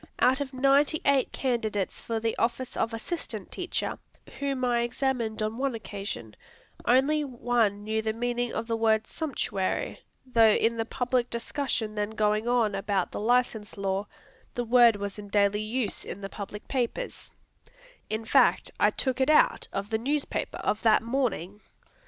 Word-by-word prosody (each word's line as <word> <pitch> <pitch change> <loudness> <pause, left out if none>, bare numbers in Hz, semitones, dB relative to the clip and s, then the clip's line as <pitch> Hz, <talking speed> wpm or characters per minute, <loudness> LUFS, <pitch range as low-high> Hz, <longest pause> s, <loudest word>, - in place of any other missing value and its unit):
Out 260 +3 +3
of 275 -1 -3
ninety 275 +3 +3
eight 280 -2 +3
candidates 220 -7 -1
for 230 -1 -2
the 225 0 -1
office 240 +2 -1
of 225 - 0
assistant 230 +10 -5
teacher, - - -3 0.4
whom 275 -2 -1
I 240 -1 +2
examined 235 -3 -1
on 215 +3 -3
one 270 -3 0
occasion, 200 - -6 0.5
only 280 +5 +4
one 240 -6 0
knew 220 +1 -1
the 220 0 -1
meaning 245 +1 -1
of 225 - -3
the 230 0 -1
word 220 -1 +2
"sumptuary," 285 - -2 0.3
although 230 -4 +5
in 230 +1 +2
the 225 - -1
public 250 0 0
discussion 235 -2 -2
then 210 0 -1
going 215 +1 +1
on 235 -4 +2
about 195 -1 -1
the - - -4
license 225 -2 +1
law, 195 +1 -1 0.5
the 245 - -1
word 235 -1 +6
was 200 0 -5
in 205 - -8
daily 205 0 +2
use 220 +1 -2
in 200 - -7
the 195 - -5
public 205 0 -8
papers; 265 - -3 0.8
in 220 +1 -3
fact, - - +3
I - - +5
took 260 -1 -1
it 265 - +3
out 305 - +4
of 200 +2 -4
the 220 - +1
newspaper 285 +4 -2
of 210 - 0
that 220 -1 +4
morning. 225 - -2
230 Hz, 165 wpm, -28 LUFS, 210-255 Hz, 0.8 s, word